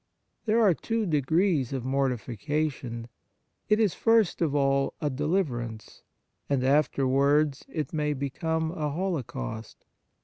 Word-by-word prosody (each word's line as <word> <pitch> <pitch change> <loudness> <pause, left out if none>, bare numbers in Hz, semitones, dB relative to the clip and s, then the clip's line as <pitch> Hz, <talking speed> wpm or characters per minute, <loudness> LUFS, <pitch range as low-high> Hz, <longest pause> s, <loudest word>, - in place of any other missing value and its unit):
There 220 +2 +3
are 210 -6 +5
two 225 +6 -2
degrees 155 - +1
of 130 -3 -3
mortifica 135 +3 -1
tion: 115 -3 -7 0.6
it 210 +1 +4
is, 215 -5 +3
first 225 -6 +2
of 150 -4 +1
all, 135 -1 +2
a 150 - -1
deliverance, 130 - -2 0.5
and 135 -3 +1
afterwards 140 +1 +2
it 155 -1 -4
may 150 -1 0
become 160 +4 -2
a 155 -4 -2
holo 175 +1 -1
caust. 110 - -7
145 Hz, 130 wpm, -27 LUFS, 130-165 Hz, 0.6 s, are